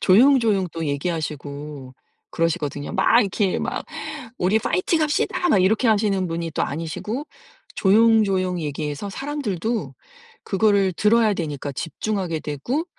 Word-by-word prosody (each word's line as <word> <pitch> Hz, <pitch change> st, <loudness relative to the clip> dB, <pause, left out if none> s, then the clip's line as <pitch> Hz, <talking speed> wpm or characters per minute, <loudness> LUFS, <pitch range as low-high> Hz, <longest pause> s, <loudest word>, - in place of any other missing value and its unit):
조용조용 220 Hz, -2 st, +4 dB
또 165 Hz, -1 st, -3 dB
얘기하시고 145 Hz, -2 st, -4 dB, 0.4 s
그러시거든요. 155 Hz, -4 st, -2 dB
막 235 Hz, -, +4 dB
이렇게 200 Hz, -2 st, 0 dB
막 -, -, -3 dB, 0.5 s
"우리 190 Hz, +5 st, +3 dB
파이팅합시다." 310 Hz, -, 0 dB
막 205 Hz, -, +5 dB
이렇게 220 Hz, +6 st, +2 dB
하시는 205 Hz, -4 st, +2 dB
분이 165 Hz, -1 st, -4 dB
또 -, -, -1 dB
아니시고 165 Hz, -, -4 dB, 0.5 s
조용조용 195 Hz, -3 st, +3 dB
얘기해서 150 Hz, +4 st, -4 dB
사람들도 230 Hz, -, -3 dB, 0.5 s
그거를 200 Hz, -1 st, +2 dB
들어야 215 Hz, +2 st, +3 dB
되니까 145 Hz, -5 st, -4 dB
집중하게 175 Hz, +2 st, -3 dB
되고 195 Hz, -, -3 dB
190 Hz, 325 characters per minute, -22 LUFS, 160-220 Hz, 0.5 s, 막